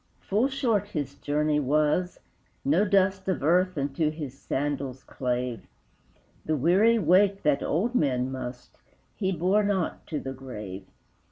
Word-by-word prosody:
Full 215 Hz, +6 st, +1 dB
short 235 Hz, -7 st, 0 dB
his 145 Hz, -8 st, -4 dB
journey 150 Hz, +1 st, 0 dB
was; 150 Hz, +5 st, +1 dB, 0.5 s
no 165 Hz, +9 st, +3 dB
dust 190 Hz, -1 st, +2 dB
Of 185 Hz, -7 st, -1 dB
earth 180 Hz, +3 st, +3 dB
unto 145 Hz, +3 st, 0 dB
his 150 Hz, -4 st, -6 dB
sandals 135 Hz, -2 st, -3 dB
clave; 125 Hz, -3 st, -3 dB, 0.8 s
The 155 Hz, -1 st, 0 dB
weary 190 Hz, -, +4 dB
weight 195 Hz, +2 st, +3 dB
that 145 Hz, -2 st, +2 dB
old 205 Hz, +11 st, 0 dB
men 130 Hz, -, +1 dB
must, 125 Hz, -1 st, -7 dB, 0.4 s
He 190 Hz, -2 st, -1 dB
bore 185 Hz, +4 st, +2 dB
not 195 Hz, -4 st, -1 dB
to 155 Hz, -, -3 dB
the 135 Hz, -1 st, -5 dB
grave. 105 Hz, -8 st, -8 dB
155 Hz, 140 wpm, -27 LUFS, 135-190 Hz, 0.8 s, weary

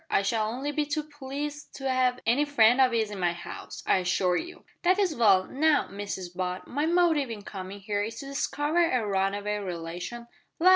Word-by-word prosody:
I 195 Hz, -, +2 dB
shall 215 Hz, +1 st, 0 dB
only 265 Hz, +5 st, -3 dB
be 295 Hz, 0 st, -1 dB
too 300 Hz, +1 st, -1 dB
pleased 290 Hz, 0 st, -6 dB
to 270 Hz, -1 st, -4 dB
'ave 255 Hz, -1 st, +2 dB
any 245 Hz, +6 st, +3 dB
friend 265 Hz, -3 st, +5 dB
of 255 Hz, -1 st, +5 dB
'is 220 Hz, -2 st, 0 dB
in 200 Hz, -, -6 dB
my 175 Hz, -1 st, 0 dB
'ouse, -, -, -8 dB
I -, -, +4 dB
assure 180 Hz, 0 st, +1 dB
you." 350 Hz, -, -5 dB, 0.2 s
"That's 370 Hz, -1 st, +3 dB
well. 205 Hz, -8 st, +5 dB
Now, 300 Hz, +6 st, +2 dB
Mrs 195 Hz, -3 st, -6 dB
Butt, 180 Hz, 0 st, -3 dB
my 290 Hz, +5 st, -1 dB
motive 330 Hz, -6 st, +3 dB
in 215 Hz, -3 st, -6 dB
coming 195 Hz, 0 st, -7 dB
here 205 Hz, 0 st, -1 dB
is 225 Hz, +2 st, -4 dB
to -, -, -8 dB
discover 290 Hz, +4 st, 0 dB
a 245 Hz, -4 st, +1 dB
runaway 200 Hz, +1 st, 0 dB
relation 180 Hz, +5 st, -5 dB, 0.2 s
" -, -, -46 dB
"La! 360 Hz, +3 st, +6 dB
235 Hz, 200 wpm, -28 LUFS, 195-290 Hz, 0.2 s, La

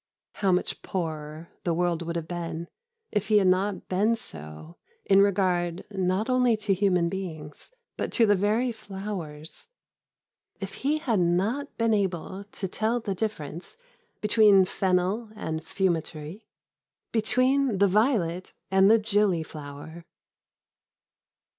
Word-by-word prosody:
How 195 Hz, -2 st, +1 dB
much 180 Hz, -, 0 dB
poorer 155 Hz, -2 st, -5 dB
the 170 Hz, -2 st, 0 dB
world 175 Hz, -1 st, 0 dB
would 170 Hz, 0 st, -4 dB
have 165 Hz, -2 st, -3 dB
been 170 Hz, -1 st, -4 dB, 0.4 s
if 210 Hz, -1 st, -1 dB
he 215 Hz, -1 st, +5 dB
had 200 Hz, -, +4 dB
not 185 Hz, +2 st, +1 dB
been 205 Hz, +5 st, +2 dB
so 80 Hz, -, -10 dB, 0.3 s
in 195 Hz, 0 st, +6 dB
regard 180 Hz, -3 st, +1 dB
not 190 Hz, +2 st, 0 dB
only 250 Hz, -3 st, +3 dB
to 210 Hz, -2 st, 0 dB
human 185 Hz, -3 st, +2 dB
beings 165 Hz, -, -6 dB, 0.3 s
but -, -, -2 dB
to 235 Hz, -, +5 dB
the 205 Hz, -1 st, +4 dB
very 215 Hz, +6 st, +1 dB
flowers 195 Hz, -, -7 dB, 0.9 s
if -, -, -6 dB
he 295 Hz, +3 st, +2 dB
had 235 Hz, -9 st, 0 dB
not 195 Hz, +12 st, 0 dB
been 230 Hz, -1 st, +2 dB
able 190 Hz, -1 st, -2 dB
to 205 Hz, -1 st, -5 dB
tell 220 Hz, +5 st, 0 dB
the 210 Hz, -4 st, -3 dB
difference 185 Hz, -, -5 dB, 0.4 s
between 210 Hz, -3 st, +6 dB
fennel 190 Hz, +5 st, 0 dB
and 160 Hz, -6 st, -4 dB
fumitory, 165 Hz, 0 st, -2 dB, 0.6 s
between 255 Hz, +2 st, +2 dB
the 200 Hz, +1 st, +5 dB
violet 190 Hz, -4 st, +1 dB, 0.2 s
and 190 Hz, +1 st, +5 dB
the 225 Hz, -, +7 dB
gillyflower! 170 Hz, -7 st, -2 dB
190 Hz, 130 wpm, -27 LUFS, 170-215 Hz, 0.9 s, the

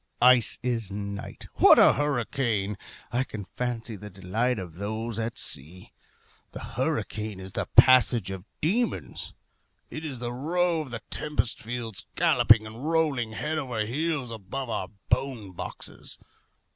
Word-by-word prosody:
Ice 125 Hz, -1 st, +5 dB
is 115 Hz, -5 st, -1 dB
night. 100 Hz, 0 st, -6 dB
What -, -, +8 dB
a -, -, +8 dB
hurricane! 120 Hz, -7 st, 0 dB, 0.4 s
I 125 Hz, +2 st, +1 dB
can 105 Hz, -6 st, -7 dB
fancy 120 Hz, -2 st, -3 dB
the 105 Hz, +1 st, -9 dB
delight 105 Hz, +6 st, -1 dB
of 90 Hz, -4 st, -7 dB
those 110 Hz, +3 st, -3 dB
at 115 Hz, +1 st, -3 dB
sea. 85 Hz, +7 st, -5 dB, 0.6 s
The -, -, -6 dB
hurricane 105 Hz, -2 st, -2 dB
is 95 Hz, 0 st, -8 dB
the -, -, -2 dB
passage 120 Hz, -5 st, +6 dB
of 95 Hz, -2 st, -6 dB, 0.2 s
demons. 225 Hz, +10 st, -1 dB, 0.6 s
It 155 Hz, -, -5 dB
is 145 Hz, -5 st, -4 dB
the 120 Hz, 0 st, -4 dB
row 165 Hz, +5 st, +1 dB
of 150 Hz, -, -7 dB
the 115 Hz, -3 st, -6 dB
tempest 150 Hz, -6 st, 0 dB
fiends 115 Hz, -2 st, -4 dB
galloping 110 Hz, -1 st, +5 dB
and 110 Hz, +4 st, -9 dB
rolling 145 Hz, -9 st, +1 dB
head 155 Hz, +7 st, -2 dB
over 120 Hz, -7 st, -2 dB
heels 140 Hz, +1 st, -1 dB
above 115 Hz, +4 st, -5 dB
our 95 Hz, -, -2 dB, 0.2 s
bone 125 Hz, -6 st, 0 dB
boxes. 90 Hz, -, -7 dB
120 Hz, 145 wpm, -27 LUFS, 105-135 Hz, 0.6 s, What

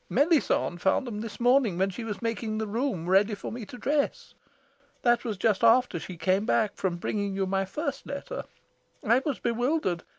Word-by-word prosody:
Melisande 285 Hz, -, +2 dB
found 190 Hz, +8 st, +2 dB
them 215 Hz, -4 st, -5 dB
this 225 Hz, -2 st, -7 dB
morning 245 Hz, -6 st, +3 dB
when 190 Hz, +1 st, +1 dB
she 210 Hz, +6 st, -6 dB
was 220 Hz, 0 st, -5 dB
making 225 Hz, -1 st, -2 dB
the 220 Hz, -, -1 dB
room 215 Hz, -, -2 dB
ready 200 Hz, +3 st, +3 dB
for -, -, -7 dB
me 225 Hz, -3 st, -7 dB
to 250 Hz, -, -9 dB
dress. 285 Hz, +4 st, -1 dB, 0.7 s
That 240 Hz, -1 st, +3 dB
was 220 Hz, -5 st, -3 dB
just 210 Hz, +1 st, +1 dB
after 230 Hz, -5 st, +4 dB
she 180 Hz, +2 st, -8 dB
came 185 Hz, +5 st, +1 dB
back 215 Hz, -3 st, +2 dB
from 180 Hz, -3 st, -2 dB
bringing 200 Hz, +2 st, -2 dB
you 195 Hz, 0 st, 0 dB
my 195 Hz, +1 st, 0 dB
first 285 Hz, -, -4 dB
letter. 280 Hz, -, -5 dB, 0.6 s
I 235 Hz, +3 st, +5 dB
was 290 Hz, -5 st, -1 dB
bewildered. 240 Hz, -, 0 dB
220 Hz, 190 wpm, -27 LUFS, 195-250 Hz, 0.7 s, I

